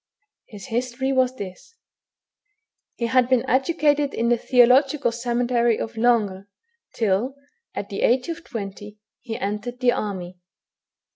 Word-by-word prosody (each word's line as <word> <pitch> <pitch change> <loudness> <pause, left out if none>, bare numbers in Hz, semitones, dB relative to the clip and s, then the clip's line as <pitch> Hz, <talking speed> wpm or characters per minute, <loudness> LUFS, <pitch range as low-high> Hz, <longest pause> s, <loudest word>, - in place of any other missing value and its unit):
His 205 -3 -10
history 250 +3 -1
was 260 -1 +2
this. 200 - -9 1.2
He 235 - -2
had 250 +1 +3
been 255 0 +2
educated 290 +1 +2
in 235 +1 0
the 240 - +5
theological 255 +3 +4
seminaiy 240 -1 +1
of 225 - -5
Langres, 215 -5 +1 0.5
till, 225 +5 0 0.4
at 200 - -5
the 200 - -4
age 250 +1 +2
of 335 0 -5
twenty, 205 - -7 0.2
he 225 -3 -5
entered 210 +5 -4
the 250 -1 +4
army. 185 -5 -4
240 Hz, 130 wpm, -23 LUFS, 210-260 Hz, 1.2 s, the